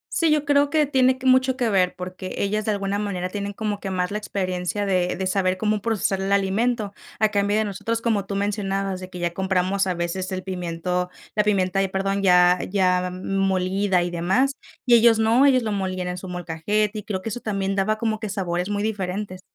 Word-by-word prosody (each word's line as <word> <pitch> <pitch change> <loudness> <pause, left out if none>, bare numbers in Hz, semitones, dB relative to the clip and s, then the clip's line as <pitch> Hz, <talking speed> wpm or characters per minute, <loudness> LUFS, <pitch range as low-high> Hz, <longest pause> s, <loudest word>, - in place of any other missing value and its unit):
Sí, 330 - +3
yo 305 -1 +2
creo 285 0 +3
que 305 0 +3
tiene 260 -2 +3
que, 260 - -10
mucho 260 0 +4
que 245 -4 0
ver 185 -3 +2
porque 185 +1 -7
ellas 210 +1 0
de 215 - +1
alguna 200 0 -1
manera 185 -3 -3
tienen 200 +1 -4
como 210 -1 -3
que 195 - -5
más 180 0 -1
la 210 - -1
experiencia 190 -1 -2
de 180 -2 +1
de 190 - -3
saber 185 0 +1
cómo 210 +1 0
procesar 205 -3 0
el 195 +1 0
alimento, 205 +2 0 0.3
a 215 - +4
cambio 205 0 +1
de 220 - +2
nosotros, 225 +3 -3
como 215 -4 0
tú 200 0 -4
mencionabas, 195 -2 -1
de 185 0 -8
que 180 - -8
ya 175 -1 -1
compramos, 190 +1 0
a 185 - +1
veces, 175 +2 -3
el 185 - -4
pimiento 180 -1 -3 0.2
la 210 -1 +1
pimienta 195 -2 +1
ay, 195 - +2
perdón, 195 +1 -1
ya 180 -1 +5
ya 180 -2 +2
molida 190 0 0
y 175 - -3
demás, 190 +11 +1 0.3
y 240 -1 +6
ellos 230 -1 +6
no, 225 +5 +4
ellos 255 -3 +4
lo 215 - -2
molían 185 -2 -2
en 180 - -4
su 185 - -8
molcajete, 180 +5 -1
y - - -9
creo 195 -3 -3
que 225 - -4
eso 235 - -4
también 195 -3 -2
daba 215 +3 +1
como 220 -1 -1
que 220 - -4
sabores 180 -2 -2
muy 205 0 -1
diferentes. 195 -2 -3
195 Hz, 220 wpm, -23 LUFS, 185-215 Hz, 0.3 s, y